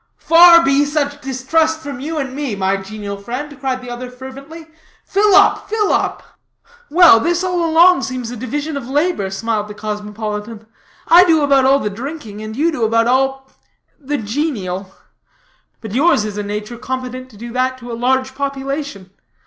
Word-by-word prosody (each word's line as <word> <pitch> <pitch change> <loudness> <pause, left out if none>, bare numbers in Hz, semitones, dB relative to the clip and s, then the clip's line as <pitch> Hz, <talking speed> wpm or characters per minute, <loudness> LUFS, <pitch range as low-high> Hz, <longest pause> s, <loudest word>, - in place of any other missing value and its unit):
"Far 335 0 +7
be 275 +1 +3
such 290 0 -2
distrust 315 +5 0
from 280 -4 -7
you 315 +4 -4
and 270 -3 -3
me, 275 -6 -3
my 190 0 0
genial 200 +1 -7
friend," 255 +8 -7
cried 260 -1 -3
the 245 - -8
other 250 +1 -6
fervently; 275 +6 -11 0.4
"fill 405 0 +3
up, 400 - +4
fill 425 -1 +1
up!" - - -1 0.7
"Well, 330 -7 +7
this 345 +8 0
all 360 -2 -1
along 340 0 +5
seems 255 -3 -4
a - - -6
division 290 +6 -4
of 265 -3 -6
labor," 290 - 0
smiled 210 +2 -2
the 210 - -9
cosmopolitan. 210 +1 -6 0.4
"I 345 +2 +8
do 320 -4 +3
about 275 -2 +3
all 270 +1 +5
the 210 -7 -3
drinking, 230 -2 -7
and 215 0 -7
you 320 +6 +1
do 250 -7 -3
about 230 +1 +2
all 265 +2 0 0.5
the 290 0 -3
genial. 205 - -3 0.9
But 220 -3 -8
yours 275 -4 +3
is 210 -1 -5
a 210 - -3
nature 210 +3 -6
competent 255 0 -5
to 215 - -17
do 235 +2 -8
that 255 +1 0
to 245 -1 -9
a - - -4
large 260 +2 0
population. 275 -7 -5
260 Hz, 175 wpm, -17 LUFS, 220-295 Hz, 0.9 s, I